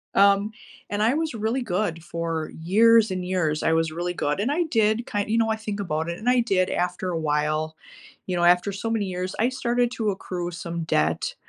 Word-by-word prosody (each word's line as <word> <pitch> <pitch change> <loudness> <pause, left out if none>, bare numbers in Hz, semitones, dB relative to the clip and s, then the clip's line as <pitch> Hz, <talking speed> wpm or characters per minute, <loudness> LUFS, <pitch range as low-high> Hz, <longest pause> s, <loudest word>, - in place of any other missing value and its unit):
Um, 200 +2 +4 0.4
and 205 +1 -1
I 235 +6 +3
was 320 -2 -1
really 225 +4 -1
good 175 -5 -2
for 165 -2 -3
years 225 +5 +5
and 185 -1 -3
years, 165 -5 0
I 160 - +3
was 160 -1 +1
really 175 +2 -3
good, 150 0 -1
and 255 +7 0
I 345 +3 +1
did 220 0 +2
ki 205 -1 -1
you 225 +2 +1
know, 225 -1 +2
I 220 - +1
think 210 -2 -5
about 160 -3 -2
it, 170 - -4
and 240 +3 0
I 250 0 +4
did 190 -5 +1
after 180 +1 -1
a 165 - -2
while, 155 +1 0 0.5
you 180 - -1
know, 175 - +1
after 180 +3 +4
so 200 +4 -4
many 215 -3 0
years, 185 0 -4
I 235 +3 +3
started 245 -1 0
to 215 -3 0
accrue 175 -2 -5
some 170 -1 -5
debt, 80 - 0
185 Hz, 220 wpm, -24 LUFS, 170-220 Hz, 0.5 s, years